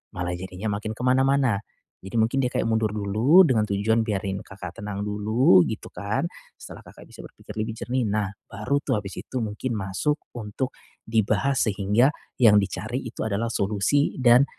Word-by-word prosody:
malah 90 0 -2
jadinya 95 +3 -4
makin 110 +1 -4
kemana-mana, 130 -2 +2 0.4
jadi 95 - -10
mungkin 110 +4 +1
dia 125 - 0
kayak - - 0
mundur 110 -1 +1
dulu 110 - +4
dengan 110 -6 +2
tujuan 105 +3 +1
biarin 100 -2 -2
Kakak 95 +3 -9
tenang 100 -1 -4
dulu 105 -1 +4
gitu 110 - -5
kan 105 +9 -2 0.3
setelah - - -11
Kakak - - -14
bisa - - -11
berpikir - - -12
lebih 110 +1 -2
jernih, 125 +1 -1
nah 105 -1 0 0.2
baru 140 +3 -1
tuh 105 - +1
habis 100 -1 -8
itu 130 - -4
mungkin 110 +3 -3
masuk 95 +7 -1 0.2
untuk 120 +4 -4 0.3
dibahas 110 +3 +1
sehingga 105 +7 +2 0.3
yang 110 -4 +7
dicari 110 +6 -3
itu 115 - -5
adalah 110 +2 -1
solusi 105 +8 +1
dan 125 +2 +6
110 Hz, 165 wpm, -25 LUFS, 100-125 Hz, 0.4 s, yang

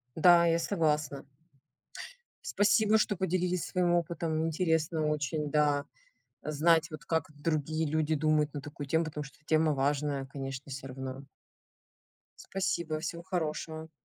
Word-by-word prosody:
Да, 170 +1 +6
я 165 0 +3
согласна. 150 -6 0 1.2
Спасибо, 215 - +3
что 210 -1 +1
поделились 180 -1 0
своим 180 -1 +1
опытом. 165 -2 0
Интересно 160 -1 0
очень, 150 0 -1
да, 145 -1 +2 0.6
знать 160 +2 +2
вот, 155 -3 -8
как 160 -1 -1
другие 155 +1 -1
люди 155 +1 +1
думают 155 -1 +2
на 145 - -3
такую 145 0 -8
тему, 160 +4 +2
потому 150 -2 -5
что 135 - -14
тема 155 0 +3
важная, 140 0 0
конечно, 135 0 -6
всё 135 0 -6
равно. 130 +1 -6 1.2
Спасибо, 170 -5 -2
всего 170 +1 -5
хорошего. 160 -2 -3
155 Hz, 130 wpm, -30 LUFS, 145-170 Hz, 1.2 s, Да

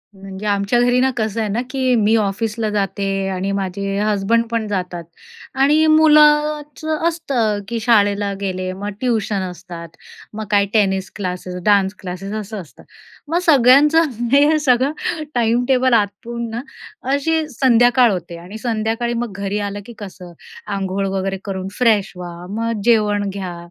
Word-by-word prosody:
म्हणजे 195 +1 -9
आमच्या 200 +3 +1
घरी 245 +1 +3
ना, 260 +1 +3
कसं 220 0 -1
आहे 215 - -1
ना, 220 +4 -1
की 260 -2 +1
मी 220 0 +3
ऑफिसला 215 +1 -1
जाते 195 -1 -1
आणि 190 +1 -2
माझे 195 0 -3
हसबंड 210 +2 +1
पण 230 -2 -1
जातात 180 -4 -3 0.6
आणि 300 +3 +4
मुलाचं 305 0 +3
असतं, 265 -11 -1
की 235 +1 -3
शाळेला 205 -3 +2
गेले, 185 -1 -3
मग 200 +2 -5
ट्यूशन 220 -5 0
असतात, 175 -1 -9 0.5
मग 215 +1 -5
काय 200 -1 +4
टेनिस 195 -3 +1
क्लासेस, 180 -2 -5
डान्स 200 -2 +3
क्लासेस, 190 +2 -6
असं 210 0 -6
असतं. 145 -8 -16 0.5
मग 340 - +2
सगळ्यांचं 295 +3 +5 0.2
हे 290 +3 +5
सगळं 260 -1 +2 0.4
टाईमटेबल 245 +2 +2
आटपून 230 +2 -1
ना, 230 +2 -4 0.5
अशी 315 +2 0
संध्याकाळ 245 -2 +4
होते 175 -2 -5
आणि 180 +5 -9
संध्याकाळी 225 +1 -2
मग 235 -2 -3
घरी 200 +1 -2
आलं 205 +1 -6
की 240 - -10
कसं, 185 -3 -10 0.4
आंघोळ 195 0 -2
वगैरे 195 0 -2
करून 190 -1 -4
फ्रेश 220 -5 +2
व्हा, 175 -1 -7 0.2
मग 230 -2 -2
जेवण 210 -3 +2
घ्या 190 -3 -6
215 Hz, 145 wpm, -19 LUFS, 195-245 Hz, 0.6 s, सगळ्यांचं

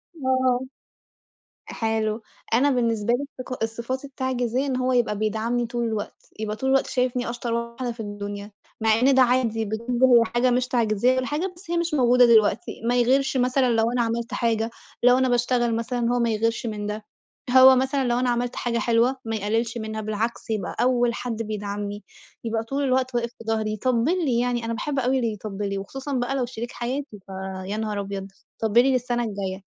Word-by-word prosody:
آه، 260 -3 +1 1.1
حلو 220 0 -1 0.3
أنا 275 +5 +4
بالنسبة 235 -3 +1
لي 265 +4 0 0.2
الصف 255 0 -6
الصفات 235 +4 -3
التعجيزية 260 -1 -1
إن 265 -2 -1
هو 255 0 +1
يبقى 235 -4 +1
بيدعمني 220 +3 0
طول 240 0 -2
الوقت، 215 -2 -5
يبقى 215 -1 -2
طول 265 +4 -2
الوقت 270 0 +3
شايفني 250 -1 0
أشطر 240 -1 -3
واحدة 235 +1 -3
في 230 - -12
الدُنيا، 205 0 -6 0.3
مع 220 0 +3
إن 265 +2 +4
ده 265 - +6
عادي 240 -3 +2
بالنسبة 235 +4 +1
لي 230 - +5
حاجة 245 +1 +3
مش 250 0 +1
تعجيزية 235 0 +2
والّا 255 0 0
حاجة، 350 +6 -2
بس 345 0 -10
هي 345 - +1
مش 340 -1 -1
موجودة 250 -3 +5
دلوقتي، 230 0 +3
ما 245 - +2
يغِيرش 265 +3 +2
مثلًا 255 0 +2
لو 225 0 +2
أنا 245 0 +1
عملت 230 0 -2
حاجة، 225 -1 0 0.3
لو 250 +1 +6
أنا 260 0 +2
باشتغل 240 -1 +1
مثلًا 235 +2 -2
هو 245 - +1
ما 235 -1 +2
يغِيرش 225 +2 0
من 210 -2 -3
ده، 210 0 -5 0.5
هو 260 0 +9
مثلًا 265 +1 +1
لَو 240 0 +1
أنا 250 0 +1
عملت 245 0 -1
حاجة 235 -1 -1
حلوة 235 +3 +2
ما 225 0 -2
يقَلّلش 225 +3 -1
منها 220 -1 -4
بالعكس 215 +3 -3
يبقى 215 -4 -2
أول 245 -1 +2
حد 235 -2 -4
بيدعمني، 205 -1 -4 0.4
يبقى 225 -1 -1
طول 275 +5 -2
الوقت 255 -1 +1
واقف 235 0 0
في - - -11
ضهري 220 -1 -1
يطَبّل 255 - +1
لي، 245 -4 +2
يعني 240 -1 0
أنا 230 - -2
باحب 275 +4 -2
أوي 260 +1 +1
اللي 230 -4 0
يطَبّل 205 -1 -5
لي 200 - -2
وخُصوصًا 270 +8 -6
بقى 250 +1 -1
لو 255 -3 0
شريك 240 0 -6
حياتي 250 -2 -4
ف - - -19 0.4
يا 205 +3 -3
نهار 215 -2 -2
أبيض 195 -1 -5 0.3
طَبّل 225 +1 +5
لي 270 - +3
للسنة 245 -1 0
الجاية. 195 -3 -4
235 Hz, 195 wpm, -24 LUFS, 220-255 Hz, 1.1 s, هو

